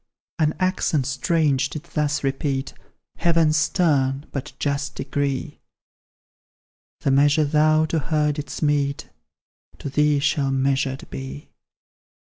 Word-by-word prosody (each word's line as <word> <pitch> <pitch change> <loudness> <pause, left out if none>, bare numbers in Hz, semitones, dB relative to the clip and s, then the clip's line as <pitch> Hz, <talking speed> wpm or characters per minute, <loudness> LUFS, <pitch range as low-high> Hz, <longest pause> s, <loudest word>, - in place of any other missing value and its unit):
An 155 -1 +2
accent 185 -6 +1
strange 140 -1 +1
did 155 +1 -7
thus 150 -4 -1
repeat 135 0 -2 0.4
Heaven's 165 -3 +3
stern 145 -4 +1
but 140 +1 -5
just 140 -1 -2
decree: 145 0 -3 1.4
"The 135 - +1
measure 145 +3 +4
thou 155 +1 +3
to 160 +1 -1
her 150 +1 +1
didst 145 +1 -5
mete, 145 -1 0 0.7
To - - -6
thee 150 +1 +3
shall 140 0 +1
measured 135 0 0
be!" 65 +2 -7
145 Hz, 110 wpm, -23 LUFS, 135-155 Hz, 1.4 s, measure